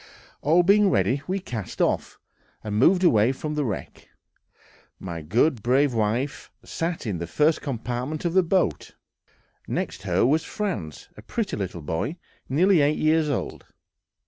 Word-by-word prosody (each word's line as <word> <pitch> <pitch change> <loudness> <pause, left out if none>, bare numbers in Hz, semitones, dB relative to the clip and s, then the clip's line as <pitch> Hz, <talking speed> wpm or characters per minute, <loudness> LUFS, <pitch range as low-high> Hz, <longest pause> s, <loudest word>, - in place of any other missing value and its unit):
All 165 +5 +4
being 200 +2 +5
ready, 135 -5 +1
we 190 +2 -1
cast 115 - -7
off, - - 0 0.5
and 105 -1 -4
moved 180 +8 +4
away 115 - +4
from 150 +3 -5
the 150 -1 0
wreck. 110 -7 -6 0.9
My 85 -3 -6
good, 115 - +1
brave 130 +4 +2
wife 115 +6 -1 0.2
sat 165 -3 -3
in 100 -6 -2
the 85 - -4
first 150 - +2
compartment 125 +4 -4
of 170 - 0
the 190 - +5
boat; 175 - 0 0.7
next - - -3
her - - +1
was 155 +5 +2
Franz, 160 - -4
a - - -10
pretty 225 -4 -3
little 90 -5 -5
boy, 80 - -2 0.3
nearly 175 +5 +4
eight 145 +2 +2
years 155 0 +2
old. 145 - -4
145 Hz, 150 wpm, -25 LUFS, 110-165 Hz, 0.9 s, being